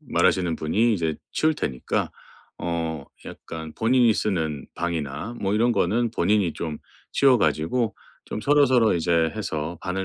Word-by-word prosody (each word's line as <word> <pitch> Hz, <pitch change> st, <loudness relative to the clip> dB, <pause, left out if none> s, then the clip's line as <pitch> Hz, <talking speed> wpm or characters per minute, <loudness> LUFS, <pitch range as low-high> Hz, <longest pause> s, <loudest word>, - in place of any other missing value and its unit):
말하시는 90 Hz, -3 st, +1 dB
분이 110 Hz, +10 st, +2 dB
이제 80 Hz, -6 st, 0 dB, 0.2 s
치울 155 Hz, 0 st, +1 dB
테니까 65 Hz, -, -2 dB, 0.5 s
어 80 Hz, -3 st, -3 dB, 0.2 s
약간 80 Hz, -1 st, -8 dB
본인이 120 Hz, 0 st, +4 dB
쓰는 80 Hz, -10 st, -2 dB
방이나 85 Hz, -, -3 dB
뭐 100 Hz, +1 st, 0 dB
이런 120 Hz, +3 st, +3 dB
거는 115 Hz, +5 st, +1 dB
본인이 105 Hz, -6 st, +1 dB
좀 80 Hz, -2 st, -4 dB, 0.4 s
치워가지고 120 Hz, -, +2 dB, 0.3 s
좀 -, -, -4 dB
서로서로 130 Hz, -5 st, +4 dB
이제 85 Hz, -1 st, +2 dB
해서 80 Hz, +2 st, -4 dB
'반을 95 Hz, +1 st, -3 dB
90 Hz, 295 characters per minute, -24 LUFS, 80-115 Hz, 0.5 s, 본인이